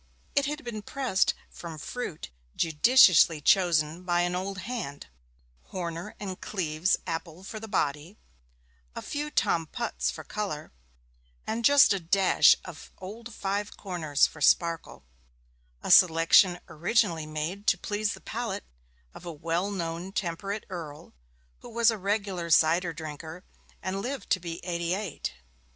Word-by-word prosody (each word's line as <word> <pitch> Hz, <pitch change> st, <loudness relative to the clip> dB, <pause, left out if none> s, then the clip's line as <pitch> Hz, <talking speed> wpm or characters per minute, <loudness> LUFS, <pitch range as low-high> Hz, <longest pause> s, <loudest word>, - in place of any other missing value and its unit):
It 280 Hz, -1 st, +2 dB
had 300 Hz, +1 st, -4 dB
been 235 Hz, -3 st, -5 dB
pressed 245 Hz, -4 st, 0 dB, 0.2 s
from 165 Hz, -2 st, -8 dB
fruit 155 Hz, -, -6 dB, 0.2 s
judiciously 165 Hz, -, +5 dB
chosen 165 Hz, -1 st, +2 dB
by 175 Hz, -1 st, +1 dB
an 175 Hz, 0 st, 0 dB
old 190 Hz, +2 st, -3 dB
hand 210 Hz, -, -5 dB, 0.6 s
Horner 175 Hz, +2 st, -5 dB
and 190 Hz, -3 st, -6 dB
Cleeves 170 Hz, -2 st, 0 dB
apple 165 Hz, +2 st, -5 dB
for 215 Hz, +3 st, -7 dB
the 220 Hz, -, -8 dB
body, 160 Hz, -1 st, -2 dB, 0.8 s
a -, -, -6 dB
few 295 Hz, +1 st, -3 dB
Tom 165 Hz, -, +1 dB
Putts 235 Hz, +6 st, -2 dB
for -, -, -6 dB
colour, 195 Hz, -8 st, -5 dB, 0.7 s
and 230 Hz, +1 st, -3 dB
just 285 Hz, -4 st, +7 dB
a 195 Hz, -, -1 dB
dash 185 Hz, +3 st, +5 dB
of 175 Hz, -4 st, -10 dB
Old 225 Hz, +6 st, -9 dB
Five 205 Hz, 0 st, -3 dB
corners 165 Hz, -7 st, +1 dB
for 150 Hz, -, -7 dB
sparkle 165 Hz, -, +2 dB, 0.8 s
a -, -, -1 dB
selection 175 Hz, +1 st, +6 dB
originally 170 Hz, -1 st, 0 dB
made 160 Hz, +7 st, -4 dB
to -, -, +4 dB
please 205 Hz, +3 st, -2 dB
the -, -, -15 dB
palate 225 Hz, -4 st, -4 dB, 0.5 s
of -, -, -12 dB
a 175 Hz, -, -6 dB
well 165 Hz, +5 st, -2 dB
known 175 Hz, -1 st, -4 dB
temperate 200 Hz, +3 st, -3 dB
earl 155 Hz, -5 st, -8 dB, 0.5 s
who -, -, -12 dB
was 235 Hz, 0 st, +3 dB
a 225 Hz, -, -4 dB
regular 195 Hz, -3 st, -2 dB
cider 165 Hz, +2 st, +4 dB
drinker, 160 Hz, +2 st, -8 dB, 0.4 s
and 190 Hz, +1 st, -2 dB
lived 260 Hz, +4 st, -5 dB
to 185 Hz, -, +3 dB
be 170 Hz, 0 st, -7 dB
eighty 170 Hz, 0 st, -1 dB
eight. 195 Hz, -, -5 dB
180 Hz, 140 wpm, -28 LUFS, 165-205 Hz, 0.8 s, just